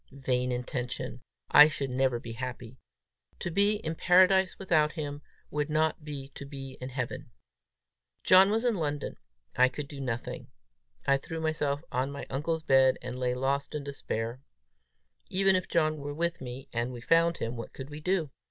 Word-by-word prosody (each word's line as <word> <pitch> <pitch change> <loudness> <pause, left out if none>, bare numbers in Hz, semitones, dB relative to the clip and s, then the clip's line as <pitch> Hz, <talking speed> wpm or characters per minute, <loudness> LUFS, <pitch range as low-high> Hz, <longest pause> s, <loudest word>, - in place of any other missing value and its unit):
Vain 125 0 +1
intention! 125 0 -4 0.3
I 150 +1 +10
should 140 -3 -3
never 130 -1 +1
be 115 - -8
happy! 125 0 -6 0.6
To 175 - -4
be 200 +4 +3
in 165 -6 -3
Paradise 185 +2 +4
without 155 -5 +2
him, 145 -3 -5 0.3
would 150 0 -1
not 155 0 +1
be 140 -2 -6
to 140 - -9
be 135 -2 -7
in 130 - -4
Heaven! 125 -2 -4 0.9
John 190 +1 +7
was 225 +3 +1
in 240 - +3
London; 150 -6 -3 0.4
I 130 0 +5
could 140 +2 -6
do 140 -1 -8
nothing! 120 -3 -4 0.6
I 140 - +4
threw 160 +4 -6
myself 155 -2 -1
on 130 +2 0
my 140 - -6
uncle's 160 +4 -1
bed, 135 -3 +5
and 125 0 -5
lay 125 -1 0
lost 140 +3 -1
in 150 - -3
despair! 125 -3 -4 0.9
Even 195 0 +3
if 185 - -1
John 155 -2 +2
were 145 0 -5
with 170 0 -1
me, 130 +1 -7
and 120 +1 -1
we 125 - -7
found 165 +6 +3
him, 115 +2 -3
what 115 -1 -7
could 135 +2 -9
we 150 - -7
do? 165 -3 0
140 Hz, 175 wpm, -29 LUFS, 130-160 Hz, 0.9 s, I